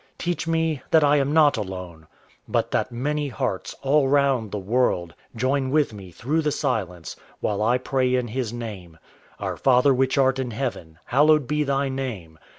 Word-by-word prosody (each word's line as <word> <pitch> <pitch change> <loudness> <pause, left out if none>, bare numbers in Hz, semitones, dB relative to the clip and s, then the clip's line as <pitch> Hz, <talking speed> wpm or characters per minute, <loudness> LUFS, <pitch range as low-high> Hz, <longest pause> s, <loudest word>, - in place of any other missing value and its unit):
Teach 175 -1 -3
me 160 -3 0
that 160 -1 +5
I 145 0 +4
am 140 0 +1
not 150 -4 +4
alone, 90 -5 -7 0.4
But - - 0
that - - 0
many 145 +5 -2
hearts, 110 -6 -3
all 140 0 +3
round 135 -5 +2
the 105 - -4
world, 95 -5 0 0.2
Join 130 +3 0
with 145 -4 +1
me 100 -3 -10
through 135 - -1
the 150 -1 0
silence, 90 - -3 0.2
while 105 -1 -1
I 120 +4 +3
pray 130 0 0
in 125 -2 -1
His 120 -1 -3
name: 105 -9 -7 0.4
_Our - - -4
Father 130 +1 +4
which 130 +2 +1
art 135 -1 +3
in 130 -2 -2
heaven, 110 -10 -5
hallowed 150 +2 +4
be 150 +3 0
Thy 140 0 0
name. 115 -13 -5
130 Hz, 175 wpm, -24 LUFS, 105-140 Hz, 0.4 s, that